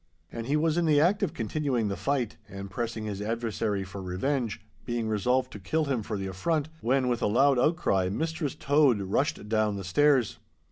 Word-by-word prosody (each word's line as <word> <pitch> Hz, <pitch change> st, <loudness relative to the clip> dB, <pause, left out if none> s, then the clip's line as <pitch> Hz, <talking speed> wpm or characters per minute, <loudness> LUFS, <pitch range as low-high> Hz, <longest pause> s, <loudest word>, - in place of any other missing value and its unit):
And 115 Hz, 0 st, -5 dB
he 145 Hz, +2 st, +2 dB
was 160 Hz, +2 st, +2 dB
in 170 Hz, -, +1 dB
the 150 Hz, -2 st, +5 dB
act 185 Hz, +8 st, +3 dB
of 195 Hz, -6 st, -1 dB
continuing 125 Hz, -1 st, -1 dB
the 100 Hz, -, -2 dB
fight, 125 Hz, +3 st, -1 dB
and 100 Hz, 0 st, -8 dB
pressing 115 Hz, +1 st, -3 dB
his 100 Hz, -2 st, -4 dB
adversary 110 Hz, -2 st, -1 dB
for 95 Hz, +1 st, -8 dB
revenge, 105 Hz, +6 st, -2 dB, 0.2 s
being 120 Hz, -2 st, -2 dB
resolved 125 Hz, +5 st, +1 dB
to 105 Hz, -, -8 dB
kill 155 Hz, +12 st, 0 dB
him 135 Hz, -5 st, -1 dB
for 105 Hz, 0 st, -4 dB
the 95 Hz, -, -4 dB
affront, 145 Hz, -, -1 dB
when, 130 Hz, 0 st, +1 dB
with 120 Hz, -1 st, 0 dB
a -, -, +2 dB
loud 135 Hz, +5 st, +4 dB
outcry, 125 Hz, -, +2 dB
Mistress 160 Hz, -, -2 dB
Tode 145 Hz, -6 st, +3 dB
rushed 105 Hz, -, -1 dB
down 110 Hz, -1 st, +1 dB
the 100 Hz, -, -5 dB
stairs. 135 Hz, +5 st, +2 dB
120 Hz, 195 wpm, -28 LUFS, 105-145 Hz, 0.2 s, the